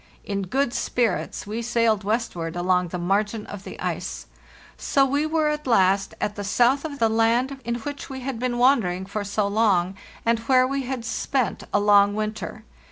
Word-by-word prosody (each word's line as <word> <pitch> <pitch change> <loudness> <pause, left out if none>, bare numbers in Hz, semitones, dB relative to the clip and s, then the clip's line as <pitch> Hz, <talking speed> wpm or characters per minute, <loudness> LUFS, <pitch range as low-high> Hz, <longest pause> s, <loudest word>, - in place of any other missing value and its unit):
In 200 -1 -3
good 265 +4 0
spirits, 235 -6 -1
we 215 +3 -4
sailed 230 -3 +1
westward 195 -6 -2
along 180 0 +1
the 180 - -5
margin 205 +4 0
of 205 -2 -8
the - - -9
ice. - - -4 0.5
So 275 -2 +2
we 285 +3 0
were 310 -1 +1
at 300 -2 -3
last 195 -3 +3
at 210 0 -2
the 205 - -5
south 245 +7 +3
of 290 -3 -5
the 230 - +3
land 230 +5 +1
in 235 +1 -2
which 285 +4 -6
we 265 -1 -6
had 255 -2 -4
been 245 -1 -1
wandering 225 -8 +3
for 205 +2 -4
so 200 +1 0
long, 200 -3 +2 0.3
and 230 0 +2
where 255 +2 +4
we 275 +1 -1
had 250 -2 -4
spent 255 0 -1
a 205 - +3
long 205 0 +5
winter. 215 0 -4
225 Hz, 185 wpm, -24 LUFS, 200-255 Hz, 0.5 s, long